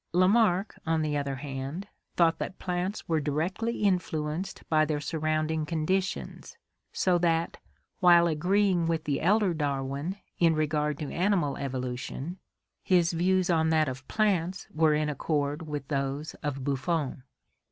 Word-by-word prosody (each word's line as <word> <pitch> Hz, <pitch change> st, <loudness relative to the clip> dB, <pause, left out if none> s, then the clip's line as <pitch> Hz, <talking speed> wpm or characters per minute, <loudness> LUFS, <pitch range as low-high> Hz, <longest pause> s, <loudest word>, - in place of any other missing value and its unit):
Lamarck, 190 Hz, +1 st, +3 dB
on 160 Hz, -1 st, +1 dB
the 150 Hz, -1 st, -1 dB
other 140 Hz, -1 st, -1 dB
hand, 140 Hz, +7 st, -5 dB, 0.3 s
thought 165 Hz, -2 st, +3 dB
that 185 Hz, -, -4 dB
plants 180 Hz, +3 st, -3 dB
were 160 Hz, -2 st, +1 dB
directly 185 Hz, +11 st, -1 dB
influenced 175 Hz, -3 st, -1 dB
by 155 Hz, -1 st, +3 dB
their 155 Hz, -1 st, -1 dB
surrounding 155 Hz, +1 st, -1 dB
conditions, 170 Hz, +5 st, -2 dB, 0.3 s
so 180 Hz, -2 st, +2 dB
that, 165 Hz, -1 st, +1 dB, 0.4 s
while 175 Hz, -2 st, +7 dB
agreeing 180 Hz, +2 st, +2 dB
with 165 Hz, -1 st, 0 dB
the 145 Hz, -3 st, -1 dB
elder 200 Hz, +1 st, +3 dB
Darwin 140 Hz, +3 st, -2 dB, 0.2 s
in 165 Hz, -2 st, +4 dB
regard 150 Hz, -1 st, 0 dB
to 145 Hz, -2 st, -5 dB
animal 175 Hz, -7 st, +1 dB
evolution, 130 Hz, +5 st, -4 dB, 0.4 s
his 180 Hz, -1 st, +3 dB
views 185 Hz, +2 st, +2 dB
on 160 Hz, -1 st, +2 dB
that 155 Hz, -1 st, +3 dB
of 130 Hz, 0 st, -6 dB
plants 190 Hz, -4 st, 0 dB
were 155 Hz, -1 st, +3 dB
in 150 Hz, 0 st, 0 dB
accord 150 Hz, +1 st, -1 dB
with 145 Hz, -2 st, -4 dB
those 140 Hz, +1 st, -2 dB
of 140 Hz, -3 st, -3 dB
Buffon. 140 Hz, +1 st, -1 dB
160 Hz, 140 wpm, -28 LUFS, 145-180 Hz, 0.4 s, while